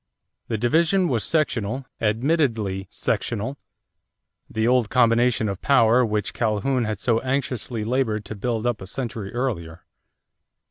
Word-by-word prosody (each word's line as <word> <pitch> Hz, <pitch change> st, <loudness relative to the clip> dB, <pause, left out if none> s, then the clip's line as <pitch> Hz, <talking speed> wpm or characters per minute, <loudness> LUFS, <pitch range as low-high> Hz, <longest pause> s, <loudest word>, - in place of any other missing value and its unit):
The 110 Hz, -, -1 dB
division 165 Hz, -, +2 dB
was 120 Hz, -5 st, +1 dB
sectional, 130 Hz, -5 st, 0 dB, 0.2 s
admittedly 110 Hz, -, 0 dB
sectional 115 Hz, +5 st, -2 dB, 0.9 s
the 110 Hz, +1 st, 0 dB
old 125 Hz, -3 st, +3 dB
combination 120 Hz, -2 st, +3 dB
of 100 Hz, -2 st, -4 dB
power 125 Hz, -3 st, +4 dB
which 105 Hz, -3 st, -1 dB
Calhoun 115 Hz, +3 st, 0 dB
had 110 Hz, -1 st, -2 dB
so 115 Hz, +3 st, +1 dB
anxiously 130 Hz, -4 st, -2 dB
labored 110 Hz, -4 st, 0 dB
to 105 Hz, -, -6 dB
build 115 Hz, +2 st, -2 dB
up 120 Hz, -4 st, 0 dB
a 95 Hz, -, -8 dB
century 110 Hz, -4 st, -5 dB
earlier. 95 Hz, -11 st, -3 dB
115 Hz, 130 wpm, -23 LUFS, 105-130 Hz, 0.9 s, power